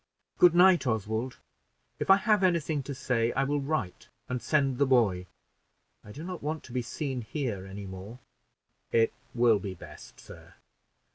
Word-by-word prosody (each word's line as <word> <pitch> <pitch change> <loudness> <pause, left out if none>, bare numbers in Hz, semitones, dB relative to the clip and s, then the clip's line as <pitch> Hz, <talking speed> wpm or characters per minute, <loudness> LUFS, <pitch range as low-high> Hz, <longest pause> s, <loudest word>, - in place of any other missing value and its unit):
"Good 175 -1 +6
night, 180 -4 +5
Oswald; 110 +2 -2 0.6
if - - -3
I 195 - +9
have 210 0 +2
any 180 -3 +3
thing 150 -1 -2
to 140 +1 -6
say, 120 -3 0
I 135 - +1
will 145 +1 0
write 135 - -3 0.2
and 125 -1 -3
send 135 -1 +1
the 140 - +3
boy. 100 -9 +2 0.8
I 105 - -12
do 145 +9 -9
not 180 0 -6
want 155 +2 -3
to - - -13
be 125 - 0
seen 130 +1 -4
here 110 -6 -4
any 100 +1 -8
more." 95 +5 -9 0.7
"It 115 -1 +3 0.2
will 120 -3 +4
be 95 -1 -6
best, - - -13
sir. - - -14
130 Hz, 170 wpm, -28 LUFS, 110-155 Hz, 0.8 s, I